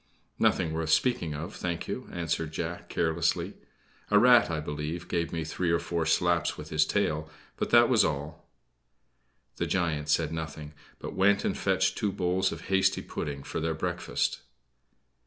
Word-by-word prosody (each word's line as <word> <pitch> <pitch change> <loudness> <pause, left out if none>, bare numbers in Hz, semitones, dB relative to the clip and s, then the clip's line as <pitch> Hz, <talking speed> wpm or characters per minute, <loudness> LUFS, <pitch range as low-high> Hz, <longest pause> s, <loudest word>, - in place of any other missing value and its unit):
"Nothing 80 - +2
worth 80 -1 -2
speaking 85 - +2
of, 80 +4 -6
thank 85 -1 -3
you," - - -5
answered 80 -2 -2
Jack, 85 +2 -5
carelessly. 80 0 0 0.6
"A 105 - +5
rat, 120 0 +6
I 80 -2 -1
believe, 75 +3 -4
gave 85 -1 -1
me 80 -1 -2
three 85 +2 -2
or 85 - +3
four 85 -1 -2
slaps - - +2
with 75 0 -9
his 75 0 +3
tail; 75 0 0 0.3
but - - -2
that 120 0 +7
was 120 -3 +4
all." 75 +3 -4 1.1
The - - -1
giant 80 -5 -1
said 75 - +2
nothing; 75 -2 -6 0.2
but - - -7
went 100 +2 +3
and - - 0
fetched 95 -1 +1
two 105 -3 0
bowls 95 +1 0
of - - -6
hasty 95 0 +1
pudding 70 -1 -5
for - - -4
their 80 0 -1
breakfast. 80 - -1
80 Hz, 165 wpm, -28 LUFS, 75-90 Hz, 1.1 s, that